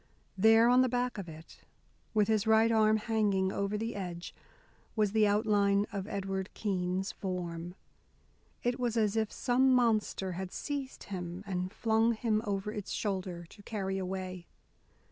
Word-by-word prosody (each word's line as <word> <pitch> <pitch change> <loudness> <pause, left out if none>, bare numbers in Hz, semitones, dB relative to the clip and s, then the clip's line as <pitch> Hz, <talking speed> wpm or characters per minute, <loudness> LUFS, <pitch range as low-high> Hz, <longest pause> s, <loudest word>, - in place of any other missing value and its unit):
There, 225 +4 +6
on 250 +1 +6
the 255 - +3
back 245 -2 -1
of 180 -4 -6
it, 160 +1 -12 0.5
with 210 -2 +2
his 220 -1 +1
right 220 +1 +5
arm 220 -1 +4
hanging 210 -4 +1
over 200 +2 -1
the 225 +2 -3
edge, 180 -3 -6 0.6
was 210 -3 +2
the 215 0 +4
outline 205 -1 +3
of 200 -1 -3
Edward 195 -1 -3
Keene's 190 -1 -1
form. 175 -2 -5 0.9
It 245 +1 0
was 240 -2 0
as 215 -1 +2
if 220 -1 0
some 260 +1 +2
monster 220 -6 +2
had 185 +1 -5
seized 280 -2 -5
him 180 -1 -6
and 185 -1 -3
flung 225 +1 +2
him 215 -1 0
over 200 0 -2
its 205 -2 -6
shoulder 185 -4 -3
to 210 - -15
carry 195 -2 -3
away. 185 -1 -5
205 Hz, 155 wpm, -31 LUFS, 190-220 Hz, 0.9 s, There